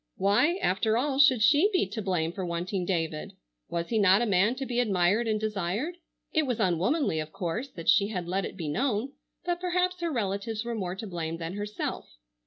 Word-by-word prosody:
Why, 205 - +3
after 220 +4 +2
all, 270 +2 0
should 260 -6 +6
she 295 - +5
be 370 - +2
to 220 +2 -4
blame 175 -5 0
for 190 +2 -5
wanting 175 +2 -2
David? 165 -4 -2 0.4
Was 170 0 -3
he 225 - +1
not 200 -1 +5
a - - +1
man 205 +3 +3
to 270 +1 -4
be 245 -1 -1
admired 205 0 +2
and 215 -1 +1
desired? 215 - -2 0.4
It 310 -3 +2
was 245 -3 -1
unwomanly, 190 - +1
of 155 0 -5
course, 185 +11 -3
that 165 -9 -9
she 200 - +5
had 180 -5 -4
let 190 +2 0
it - - -6
be 165 -4 -4
known, 240 - 0 0.3
but 350 -1 -1
perhaps 360 0 0
her 340 -1 -1
relatives 215 -1 -2
were 235 - -2
more 185 -5 -3
to 205 - -6
blame 165 -4 -4
than 165 +1 -5
herself. 205 - -5
205 Hz, 205 wpm, -28 LUFS, 180-245 Hz, 0.4 s, should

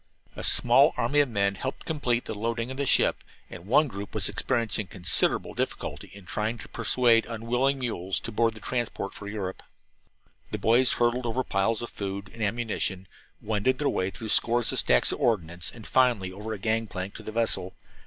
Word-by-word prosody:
A - - -7
small - - +5
army 145 - +2
of 145 -2 +3
men 100 -3 +1
helped 130 +7 -5
complete 125 -7 -1
the - - -4
loading 115 +3 -3
of 130 - -7
the 140 -1 -1
ship, - - +4 0.3
and 90 +2 -10
one 145 +7 +4
group 100 -4 -8
was - - +1
experiencing 110 -3 -1
considerable 90 -2 +2
difficulty - - -4
in 100 -2 -13
trying 110 +5 -2
to - - -10
persuade 115 0 +3
unwilling 120 +4 0
mules 95 -7 -2
to 115 - -6
board 115 +1 +1
the - - -10
transport 120 -5 -3
for 100 - -9
Europe. 100 -3 -5 0.9
The - - -3
boys 120 +3 +4
hurdled 120 +1 +1
over 125 +3 -1
piles 110 +3 0
of 120 - -6
food 100 0 -5
and 115 - -10
ammunition, 100 -3 -1 0.4
wended 110 +5 +1
their 145 - 0
way 95 - -1
through 110 +3 -7
scores 120 +2 +2
of - - 0
stacks 60 - +3
of - - -5
ordnance, 85 -6 0
and 115 -2 -12
finally 120 -8 +2
over 105 +4 -7
a 110 - -3
gang 110 +2 0
plank 95 0 -5
to - - -10
the - - -7
vessel. 110 -5 0
115 Hz, 195 wpm, -27 LUFS, 100-120 Hz, 0.9 s, small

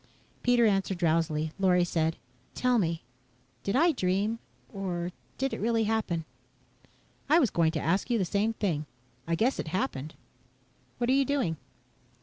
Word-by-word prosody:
Pete 245 0 +3
answered 195 -4 +2
drowsily. 160 -2 +1
Lorry 180 -2 +4
said, 165 -2 0 0.4
"Tell 250 -1 +2
me 165 - -1 0.6
did 200 - -1
I 335 +6 +5
dream, 205 - 0 0.3
or 180 -3 -3 0.3
did 270 0 -1
it - - -3
really 225 +1 +2
happen." 210 -7 -1 1.0
"I 310 - +6
was 270 - +3
going 165 -2 +3
to 155 - -1
ask 175 - 0
you 240 - +2
the 195 - +1
same 205 +5 +1
thing. 165 -9 -1 0.4
I 170 - +1
guess 240 +9 +1
it - - -3
happened. 155 - -2 0.8
What 245 +1 +1
are - - +5
you 275 +1 +4
doing?" 260 - 0
195 Hz, 155 wpm, -29 LUFS, 165-235 Hz, 1.0 s, I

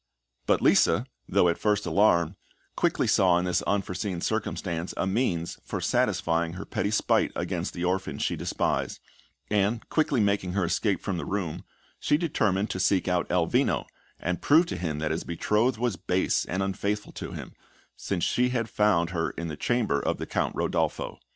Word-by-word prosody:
But - - +2
Lisa, - - +4 0.2
though 90 - +4
at 85 - 0
first 105 -1 +1
alarmed, 85 -5 +3 0.4
quickly - - +1
saw 90 -2 +4
in 90 - 0
this 90 - +1
unforeseen 95 -2 -1
circumstance, 85 0 -2
a - - 0
means 95 -5 -1
for - - -4
satisfying 85 0 +1
her 95 +3 -7
petty 100 - -1
spite 105 - +2
against - - -3
the 85 - -3
orphan 95 +1 -1
she - - -1
despised; - - -1 0.5
and, 105 +2 +1
quickly 150 -5 +1
making 100 -3 +1
her 95 -2 +1
escape 100 +3 0
from 95 -3 -2
the - - -4
room, 90 -4 -3 0.3
she 145 - +2
determined 105 - 0
to 95 - -3
seek 95 0 +2
out 90 -1 0
Elvino, 85 -2 +1 0.3
and 90 +1 -2
prove 160 +4 +5
to 100 - -4
him 80 -4 -3
that 75 0 -1
his 80 - -2
betrothed 105 +8 +1
was 120 -4 -1
base 90 +1 0
and 95 +2 -1
unfaithful 100 +2 -2
to - - -7
him, - - -8 0.4
since 90 -4 -3
she 125 0 +2
had 120 -3 -1
found 90 -5 +2
her 85 -2 -1
in 85 -1 -5
the 75 - -4
chamber 110 -5 +1
of - - -1
the - - -4
Count - - -1
Rodolpho. - - -1
95 Hz, 175 wpm, -27 LUFS, 85-105 Hz, 0.5 s, prove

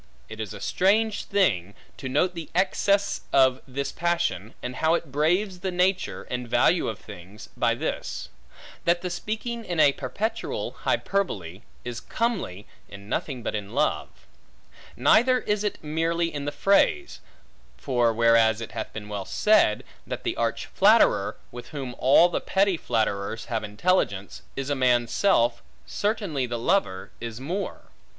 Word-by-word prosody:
It 110 0 -9
is 110 -2 -4
a 105 - -8
strange 210 - +1
thing, 100 - +1 0.2
to 130 - -5
note 165 +7 +1
the 165 -3 -7
excess 200 +2 +1
of 130 -1 +4
this 140 +1 -3
passion, 170 - -1
and 125 +1 -5
how 160 +1 +3
it 165 -4 -4
braves 180 +7 +1
the 190 - -2
nature, 185 +1 0
and 125 -1 -5
value 160 +9 +3
of 110 - -3
things, 100 0 -12
by - - +2
this; - - -4 0.6
that 175 +1 +2
the 180 - -3
speaking 225 +5 -4
in 175 -6 -3
a 145 - +7
perpetual 145 - -3
hyperbole, 100 - -2 0.2
is 120 -1 -4
comely 195 - -2 0.2
in 100 +1 -11
nothing 130 -1 -3
but - - -2
in 105 +2 -5
love. 150 +2 +1 0.9
Neither 255 +3 +5
is 210 0 -1
it 210 - -1
merely 165 +2 0
in 145 -1 -4
the 145 - -2
phrase; 200 - +2 0.6
for 120 -4 +1
whereas 115 -1 +4
it 115 - -7
hath 110 0 -5
been 105 -1 -7
well 100 -2 -4
said, 210 - +3 0.2
that - - -5
the - - -1
arch - - -1
flatterer, - - +4
with 120 0 -9
whom 135 -5 -6
all 140 +6 +6
the 175 - -2
petty 195 -1 +2
flatterers 110 -5 -1
have 110 - -1
intelligence, 105 - 0
is 135 +1 -3
a - - +2
man's 125 -3 +2
self; 120 -12 +2 0.2
certainly 200 - -1
the 120 0 -3
lover 115 - 0
is 115 -1 -6
more. 175 +9 -5
140 Hz, 155 wpm, -25 LUFS, 115-185 Hz, 0.9 s, a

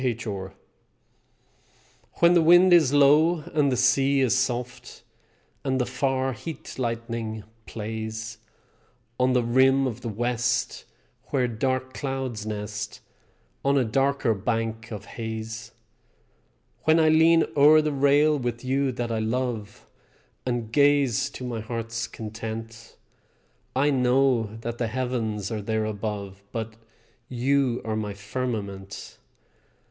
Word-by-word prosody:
H. 120 -3 -1
R._) 95 -3 -5 1.6
When 170 +1 +4
the 175 - +5
wind 175 +3 +6
is 160 -6 +6
low, 150 +4 +5
and 145 -3 +2
the 125 - 0
sea 135 +2 +3
is 130 -2 +3
soft, 125 -1 -3 0.6
And 130 -1 0
the 125 - +1
far 130 +1 -1
heat 155 +3 -8
lightning 115 -2 -3 0.2
plays 110 0 -5 0.8
On 125 0 +3
the 125 -1 +2
rim 130 +3 +4
of 120 -5 -4
the 115 - -4
West 120 +2 -1 0.4
where 130 -3 0
dark 130 +2 -2
clouds 130 -6 -4
nest 105 0 -5 0.6
On 140 0 +3
a 130 - +3
darker 135 +1 +1
bank 115 +2 -2
of 105 -3 -6
haze; 110 0 -6 1.1
When 160 +1 +5
I 160 -1 +5
lean 165 +1 +5
o'er 150 +2 +7
the 155 0 0
rail 145 +2 +3
with 120 0 -4
you 135 +1 +1
that 120 -1 -3
I 110 - -1
love 110 -2 -3 0.6
And 120 -3 -2
gaze 140 -3 +3
to - - -9
my 120 -2 -3
heart's 115 +1 -4
content; 115 +1 -7 0.8
I 145 +3 +3
know 125 -4 +2
that 120 0 -5
the 120 - 0
heavens 115 -4 -2
are 110 -2 -3
there 110 +1 -1
above 100 -2 -5
But 110 -1 -5 0.5
you 130 0 +1
are 110 -1 -2
my 105 -2 -3
firmament. 105 -3 -5
120 Hz, 130 wpm, -25 LUFS, 110-135 Hz, 1.6 s, o'er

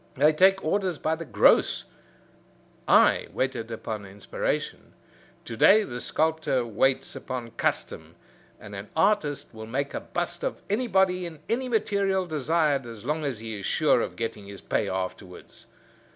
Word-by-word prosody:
They 150 +4 +4
take 190 +3 +4
orders 185 0 0
by 155 - -1
the 165 +1 -5
gross. - - +4 1.0
I - - +5
waited 125 -4 -2
upon 110 -2 -5
inspiration. 100 0 -4 0.5
To 115 - -6
day 210 - +6
the 125 -8 -6
sculptor 155 -5 0
waits 125 +4 0
upon 120 -3 -6
custom, 115 - -3 0.4
and 105 -1 -11
an 100 +1 -7
artist 160 - +1
will 110 0 -8
make 140 +4 -2
a - - -2
bust - - -4
of - - -2
anybody 190 -6 +2
in 160 -3 -10
any 255 +3 -1
material 200 -4 +1
desired 150 -3 0
as 115 -1 -10
long 150 +3 -1
as 140 -5 -2
he 110 -1 -6
is 100 - -4
sure - - +3
of - - -4
getting 110 -3 -5
his 100 -1 -9
pay - - -1
afterwards. 95 0 -6
145 Hz, 150 wpm, -26 LUFS, 115-180 Hz, 1.0 s, day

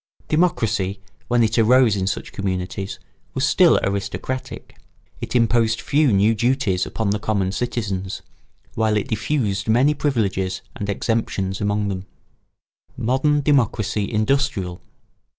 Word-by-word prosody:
Democracy, 115 - +1 0.3
when 120 -1 +3
it 115 +1 +1
arose 120 -1 +5
in 95 -1 -1
such 95 - -3
communities, 95 0 -3 0.4
was - - +1
still - - +5
aristocratic; 100 +6 -4 0.5
it - - -5
imposed 115 -1 +3
few 145 +1 +2
new 100 +3 +4
duties 115 -5 0
upon 110 -3 -1
the 105 - 0
common 100 -3 0
citizens, 100 -4 -3 0.5
while 110 -1 +1
it 105 - -2
diffused 110 -4 -1
many 125 +7 +4
privileges 100 -10 -1
and 105 -5 -4
exemptions 100 -3 -1
among 105 0 0
them. 95 -2 -2 1.0
[Sidenote: - - -4
Modern 145 +4 +2
democracy 110 -7 +1
industrial. 110 -5 0
110 Hz, 125 wpm, -21 LUFS, 100-125 Hz, 1.0 s, arose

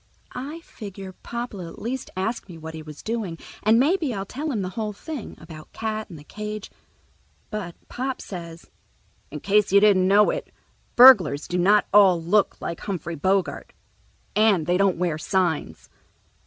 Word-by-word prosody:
I 290 +6 -6
figure 195 - -9
Pop'll 235 -1 -6
at 165 -1 -9
least 255 +3 -4
ask 205 +2 -3
me 170 - -9
what 160 0 -8
he 160 - -7
was 155 -1 -11
doing, 215 -7 -3 0.2
and 220 +2 +4
maybe 305 - +1
I'll 195 0 -4
tell 290 +9 -4
him 215 -7 -2
the 185 - -3
whole 210 +2 -4
thing—about 175 - -9
Cat 215 -1 -4
and 170 - -10
the 145 - -12
cage. 210 +4 -7 0.8
But 200 -6 -5
Pop 260 +1 -4
says, 170 -3 -9 0.6
"In 150 0 -7
case 205 0 +2
you 200 - +7
didn't 200 -3 +4
know 205 +2 +5
it, - - -5 0.4
burglars 195 - +7
do 180 - -1
not 205 +4 +4
all 195 -4 +6
look 190 +5 +1
like 170 - -5
Humphrey 175 -4 -4
Bogart, 185 +5 -1 0.6
and 210 -7 +3
they 175 +2 +1
don't 195 -2 +2
wear 170 -3 -1
signs." 165 - -1
195 Hz, 165 wpm, -24 LUFS, 170-220 Hz, 0.8 s, you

